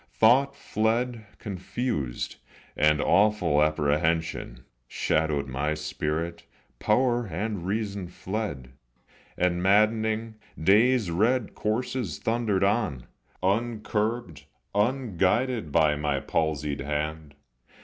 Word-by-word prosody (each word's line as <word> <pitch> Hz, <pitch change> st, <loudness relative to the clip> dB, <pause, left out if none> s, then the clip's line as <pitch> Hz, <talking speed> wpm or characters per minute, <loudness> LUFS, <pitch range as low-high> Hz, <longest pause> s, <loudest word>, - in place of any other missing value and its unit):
Thought 125 Hz, +5 st, +4 dB
fled 115 Hz, +1 st, -1 dB
confused, 100 Hz, -, -3 dB, 0.4 s
and 75 Hz, 0 st, +3 dB
awful 100 Hz, -7 st, +3 dB
apprehension 75 Hz, -3 st, 0 dB, 0.2 s
Shadowed 75 Hz, -1 st, 0 dB
my 70 Hz, +4 st, -1 dB
spirit, 75 Hz, +2 st, -3 dB, 0.4 s
power 120 Hz, +1 st, +2 dB
and 95 Hz, +1 st, -3 dB
reason 100 Hz, -2 st, -2 dB
fled; 90 Hz, -, -5 dB, 0.7 s
And, 90 Hz, -1 st, +1 dB
maddening, 110 Hz, +3 st, +2 dB, 0.2 s
day's 105 Hz, +3 st, +4 dB
red 110 Hz, +6 st, +1 dB
coursers 110 Hz, -, -2 dB
thundered 110 Hz, -4 st, 0 dB
on, 100 Hz, -, 0 dB, 0.4 s
Uncurbed, 105 Hz, -4 st, -1 dB, 0.3 s
unguided 115 Hz, -, +1 dB
by 75 Hz, -1 st, +4 dB
my 75 Hz, -2 st, -1 dB
palsied 75 Hz, 0 st, -1 dB
hand. 75 Hz, +1 st, -3 dB
95 Hz, 85 wpm, -27 LUFS, 75-110 Hz, 0.7 s, Thought